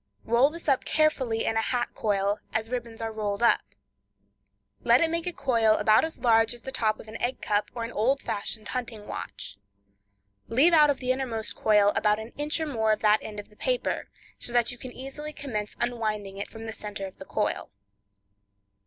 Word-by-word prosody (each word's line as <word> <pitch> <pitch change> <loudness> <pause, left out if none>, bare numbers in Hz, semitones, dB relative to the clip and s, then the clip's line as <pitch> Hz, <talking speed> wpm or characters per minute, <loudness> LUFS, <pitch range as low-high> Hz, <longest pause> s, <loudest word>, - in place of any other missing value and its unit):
Roll 240 +5 +4
this 335 +2 -10
up 270 -3 +3
carefully 265 -8 +1
in 225 - +1
a - - +3
hat 240 +1 0
coil, 200 -1 0
as 220 +1 -1
ribbons 235 -2 -4
are 225 0 -2
rolled 210 0 -2
up. 235 - +5 1.2
Let - - +6
it 330 -1 +2
make 335 +1 -1
a - - +1
coil 230 -8 +3
about 215 0 +4
as 320 0 -2
large 225 -1 +3
as 240 - -10
the 265 - -6
top 215 -4 0
of - - -11
an 220 +1 -8
egg 250 +2 -1
cup 205 0 0
or 235 - -3
an 230 - -4
old 255 +6 +2
fashioned 215 -1 -4
hunting 235 -4 -4
watch. 100 - -6 0.9
Leave 280 +9 +4
out 300 -2 +7
of 285 - +2
the 255 -1 0
innermost 245 -4 -2
coil 205 -1 +4
about 210 -1 +3
an 220 +2 -8
inch 295 +2 -1
or 320 - -1
more 220 -7 +1
of 215 - -3
that 210 0 +4
end 210 -1 -6
of 205 - -9
the 210 - -20
paper, - - -1 0.3
so - - -2
that 240 -1 +3
you 245 - -9
can 255 - -7
easily 270 +4 -7
commence 215 -8 -4
unwinding 215 -5 -2
it 200 - -4
from 225 0 -9
the 225 - -4
center 210 -2 -5
of 190 - -10
the - - -9
coil. - - -1
230 Hz, 205 wpm, -27 LUFS, 215-260 Hz, 1.2 s, out